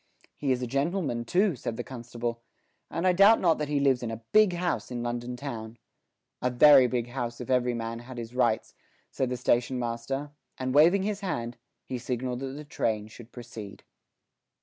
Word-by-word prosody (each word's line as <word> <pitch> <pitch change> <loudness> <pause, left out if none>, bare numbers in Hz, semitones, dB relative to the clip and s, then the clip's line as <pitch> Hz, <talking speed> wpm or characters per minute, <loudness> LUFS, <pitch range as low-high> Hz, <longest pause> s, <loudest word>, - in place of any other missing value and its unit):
"He 140 -2 -1
is 125 0 0
a - - 0
gentleman 140 -1 -1
too," 185 - +2
said 115 -2 -5
the 120 - -3
constable, 120 -2 -5 0.5
"and 170 - -2
I 185 - +5
doubt 200 +5 +7
not 165 -4 +3
that 150 - -1
he 145 -1 0
lives 135 -3 +3
in 120 - -3
a 115 0 -6
big 215 -3 +5
house 175 0 -2
in 120 -1 -4
London 120 +1 -3
town." 115 -4 -6 0.6
"A 125 - +1
very 130 +1 +7
big 120 -1 -2
house 120 -2 -4
if 125 +1 -5
every 125 -1 +2
man 115 0 -4
had 125 +1 -10
his 115 0 -6
rights," 120 -3 +1 0.4
said 130 - -1
the 125 - -2
station 125 +1 +1
master, 125 +4 -3 0.3
and 130 0 -2
waving 170 +7 +5
his 205 0 -2
hand 120 - -3 0.3
he 125 - -4
signalled 125 0 -3
that 135 - -4
the 150 +2 -8
train 110 -6 -2
should 115 +2 -13
proceed. 110 -4 -9
125 Hz, 195 wpm, -28 LUFS, 120-145 Hz, 0.6 s, doubt